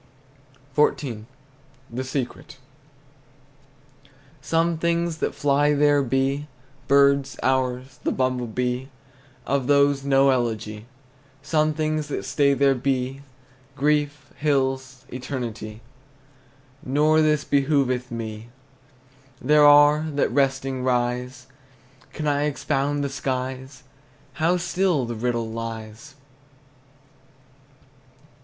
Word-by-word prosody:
XIV. 125 Hz, -7 st, 0 dB, 0.7 s
THE 125 Hz, +3 st, -3 dB
SECRET. 130 Hz, -1 st, -5 dB, 1.8 s
Some 165 Hz, 0 st, 0 dB
things 170 Hz, 0 st, 0 dB
that -, -, -2 dB
fly 145 Hz, +1 st, +2 dB
there 145 Hz, 0 st, +4 dB
be, 135 Hz, +3 st, 0 dB, 0.4 s
Birds, 140 Hz, -1 st, +3 dB
hours, 130 Hz, 0 st, -1 dB
the -, -, 0 dB
bumble 130 Hz, -2 st, -1 dB
bee: 125 Hz, +3 st, -2 dB, 0.6 s
Of 135 Hz, -2 st, -1 dB
these 140 Hz, -1 st, +3 dB
no 135 Hz, 0 st, +4 dB
elegy. 110 Hz, -3 st, -2 dB, 0.6 s
Some 155 Hz, 0 st, +1 dB
things 155 Hz, -1 st, -1 dB
that 145 Hz, -, -4 dB
stay 140 Hz, -1 st, +2 dB
there 135 Hz, +1 st, +4 dB
be, 130 Hz, +1 st, -2 dB, 0.5 s
Grief, 145 Hz, 0 st, 0 dB
hills, 130 Hz, -3 st, -1 dB
eternity: 120 Hz, -4 st, -6 dB, 1.0 s
Nor 155 Hz, +2 st, +3 dB
this 150 Hz, -1 st, +2 dB
behooveth 135 Hz, -3 st, +1 dB
me. 115 Hz, -1 st, -6 dB, 0.9 s
There 150 Hz, +2 st, +5 dB
are, 145 Hz, +1 st, +7 dB
that 140 Hz, -, +1 dB
resting, 135 Hz, -1 st, 0 dB
rise. 125 Hz, 0 st, -1 dB, 0.7 s
Can 155 Hz, -, -5 dB
I 145 Hz, 0 st, +1 dB
expound 145 Hz, 0 st, -1 dB
the 140 Hz, -, -1 dB
skies? 130 Hz, -1 st, -4 dB, 0.6 s
How 175 Hz, +3 st, +3 dB
still 175 Hz, -5 st, 0 dB
the 120 Hz, -, -4 dB
riddle 115 Hz, 0 st, -2 dB
lies! 115 Hz, +4 st, -7 dB
135 Hz, 95 wpm, -23 LUFS, 125-145 Hz, 1.8 s, are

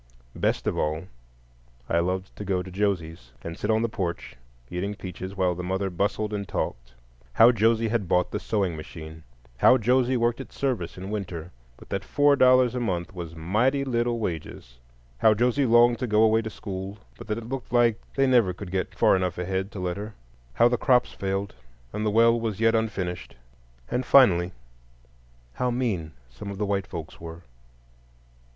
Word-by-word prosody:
Best -, -, 0 dB
of -, -, 0 dB
all 75 Hz, +1 st, -1 dB, 0.8 s
I 85 Hz, -, +2 dB
loved 95 Hz, +2 st, -2 dB
to -, -, -6 dB
go 95 Hz, -2 st, -1 dB
to 95 Hz, -, -10 dB
Josie's, 85 Hz, -10 st, -2 dB
and 85 Hz, 0 st, -5 dB
sit 105 Hz, -, -4 dB
on 110 Hz, +1 st, +2 dB
the -, -, +2 dB
porch, 95 Hz, -6 st, -4 dB, 0.3 s
eating 95 Hz, +6 st, -3 dB
peaches, 95 Hz, 0 st, -7 dB
while 90 Hz, -2 st, +2 dB
the 90 Hz, -, -6 dB
mother 95 Hz, +2 st, -2 dB
bustled 105 Hz, +4 st, -1 dB
and 100 Hz, -2 st, -3 dB
talked: -, -, -4 dB, 0.4 s
how 115 Hz, -, +7 dB
Josie 115 Hz, 0 st, +2 dB
had 110 Hz, -4 st, -1 dB
bought 90 Hz, +2 st, +1 dB
the -, -, -2 dB
sewing 100 Hz, -6 st, -1 dB
machine; 80 Hz, 0 st, -9 dB, 0.4 s
how 125 Hz, -, +6 dB
Josie 125 Hz, +2 st, +2 dB
worked 120 Hz, +2 st, 0 dB
at -, -, -11 dB
service 120 Hz, -13 st, -2 dB
in 95 Hz, +2 st, -6 dB
winter, 90 Hz, -5 st, -5 dB, 0.3 s
but -, -, -16 dB
that 100 Hz, -1 st, -2 dB
four 145 Hz, +4 st, +3 dB
dollars 130 Hz, -2 st, +5 dB
a 125 Hz, -, -2 dB
month 90 Hz, -7 st, -2 dB
was 85 Hz, -3 st, -7 dB
"mighty 120 Hz, -, +1 dB
little" 120 Hz, -2 st, 0 dB
wages; 80 Hz, -, -6 dB, 0.4 s
how 110 Hz, +7 st, +5 dB
Josie 125 Hz, +4 st, +2 dB
longed 120 Hz, 0 st, +5 dB
to 125 Hz, -, -2 dB
go 105 Hz, 0 st, +4 dB
away 110 Hz, 0 st, +4 dB
to 110 Hz, -, -5 dB
school, 95 Hz, -1 st, -6 dB, 0.2 s
but -, -, -11 dB
that 105 Hz, 0 st, -2 dB
it 115 Hz, -1 st, -7 dB
"looked 135 Hz, 0 st, -5 dB
like" 120 Hz, -2 st, +3 dB
they 135 Hz, -, +3 dB
never 120 Hz, -8 st, +3 dB
could 90 Hz, 0 st, -9 dB
get 95 Hz, -1 st, -2 dB
far -, -, +4 dB
enough 90 Hz, -2 st, -1 dB
ahead 95 Hz, +2 st, -2 dB
to 100 Hz, -, -7 dB
let 90 Hz, 0 st, -2 dB
her; 105 Hz, +1 st, -7 dB, 0.4 s
how 120 Hz, -, +5 dB
the 120 Hz, -1 st, 0 dB
crops 125 Hz, -3 st, +3 dB
failed 95 Hz, +1 st, -3 dB, 0.4 s
and 105 Hz, +1 st, -3 dB
the 110 Hz, -, +1 dB
well 115 Hz, +2 st, +4 dB
was 110 Hz, -3 st, -3 dB
yet 115 Hz, 0 st, +4 dB
unfinished; 95 Hz, -6 st, -2 dB, 0.6 s
and, 125 Hz, -, 0 dB
finally, 95 Hz, -10 st, +5 dB, 1.0 s
how 125 Hz, -, -1 dB
"mean" 110 Hz, -11 st, -2 dB
some 65 Hz, +12 st, -9 dB
of 100 Hz, -, -6 dB
the 105 Hz, -, -1 dB
white 100 Hz, -2 st, -1 dB
folks 80 Hz, -1 st, -8 dB
were. 85 Hz, +1 st, -9 dB
100 Hz, 185 wpm, -26 LUFS, 90-115 Hz, 1.0 s, how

